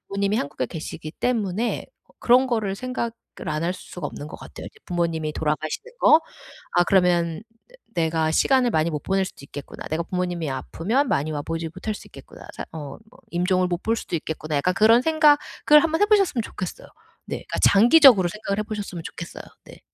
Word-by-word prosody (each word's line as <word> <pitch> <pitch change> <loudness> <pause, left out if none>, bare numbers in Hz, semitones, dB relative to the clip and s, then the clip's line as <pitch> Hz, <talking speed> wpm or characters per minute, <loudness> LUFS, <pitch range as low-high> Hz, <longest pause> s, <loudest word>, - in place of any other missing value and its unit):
부모님이 200 +1 0
한국에 140 - -2
계시기 155 +2 -7
때문에 225 -2 -1 0.3
그런 250 +2 +5
거를 220 -6 -1
생각을 255 0 -3 0.4
안 155 +1 -1
할 175 - 0
수가 180 -3 -7
없는 145 - -8
것 - - -9
같아요. - - -10
이제 - - -13
부모님이 165 -3 -1
돌아가시는 155 - -3
거. 315 - +7 0.5
'아 175 - +4
그러면 175 -2 +2 0.3
내 - - -24 0.3
내가 160 -1 0
시간을 255 +7 +3
많이 160 -3 +1
못 150 -3 -4
보낼 195 0 +1
수도 - - -10
있겠구나. 140 0 -9
내가 160 +2 -1
부모님이 175 -4 -2
아프면 220 - -1
많이 155 -4 0
와보지 165 +2 -4
못할 210 +4 -4
수 - - -11
있겠구나. - - -13
사 - - -6
어 145 -4 -7 0.3
임종을 180 +1 +1
못 175 0 -3
볼 225 +1 +1
수도 185 - -6
있겠구나.' 155 -1 -4
약간 180 +6 +1
그런 225 +3 +5
생각을 300 -1 +4
한번 325 0 0
해보셨으면 400 - +3
좋겠어요. 185 -3 -7 0.4
네. - - -3
그니까 - - -6
장기적으로 235 - +7
생각을 200 +1 -4
해보셨으면 205 -5 -5
좋겠어요. 170 0 -8 0.2
네. - - -14
185 Hz, 410 characters per minute, -23 LUFS, 160-235 Hz, 0.5 s, 거